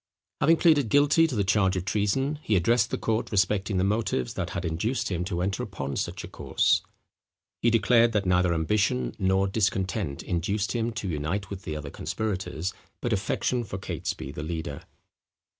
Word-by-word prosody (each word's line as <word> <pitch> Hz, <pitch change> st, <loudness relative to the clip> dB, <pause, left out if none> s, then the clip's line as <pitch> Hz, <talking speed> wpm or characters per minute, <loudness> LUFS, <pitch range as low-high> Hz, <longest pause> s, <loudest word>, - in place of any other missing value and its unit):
Having 165 Hz, +1 st, +5 dB
pleaded 150 Hz, -9 st, +4 dB
guilty 145 Hz, +4 st, +5 dB
to 140 Hz, -, -4 dB
the 100 Hz, -, +2 dB
charge 95 Hz, -1 st, +2 dB
of 90 Hz, -1 st, -2 dB
treason, 135 Hz, +9 st, 0 dB
he 110 Hz, -, +1 dB
addressed 115 Hz, +7 st, +3 dB
the -, -, -2 dB
court 110 Hz, 0 st, -1 dB
respecting 100 Hz, 0 st, +1 dB
the 90 Hz, -, +2 dB
motives 100 Hz, -, 0 dB
that -, -, -3 dB
had 90 Hz, -, -4 dB
induced 95 Hz, +10 st, -1 dB
him 90 Hz, -1 st, -1 dB
to 90 Hz, -2 st, -2 dB
enter 95 Hz, +1 st, -1 dB
upon 70 Hz, 0 st, -4 dB
such -, -, -3 dB
a -, -, -6 dB
course. -, -, +1 dB, 0.8 s
He 120 Hz, -, +4 dB
declared 115 Hz, +1 st, +4 dB
that 105 Hz, -2 st, +1 dB
neither 90 Hz, -1 st, +3 dB
ambition 80 Hz, -, +1 dB
nor 95 Hz, +1 st, +2 dB
discontent 95 Hz, -5 st, -1 dB
induced 100 Hz, +5 st, -1 dB
him 120 Hz, -1 st, -1 dB
to 105 Hz, -2 st, -4 dB
unite 85 Hz, +6 st, -2 dB
with 100 Hz, -1 st, -7 dB
the 75 Hz, -, -3 dB
other 75 Hz, -2 st, -6 dB
conspirators, 95 Hz, -4 st, -3 dB, 0.3 s
but 120 Hz, -, -1 dB
affection 110 Hz, +4 st, 0 dB
for 95 Hz, -3 st, -6 dB
Catesby 70 Hz, -7 st, -4 dB
the 75 Hz, -, -6 dB
leader. 80 Hz, -2 st, -5 dB
100 Hz, 175 wpm, -27 LUFS, 90-115 Hz, 0.8 s, Having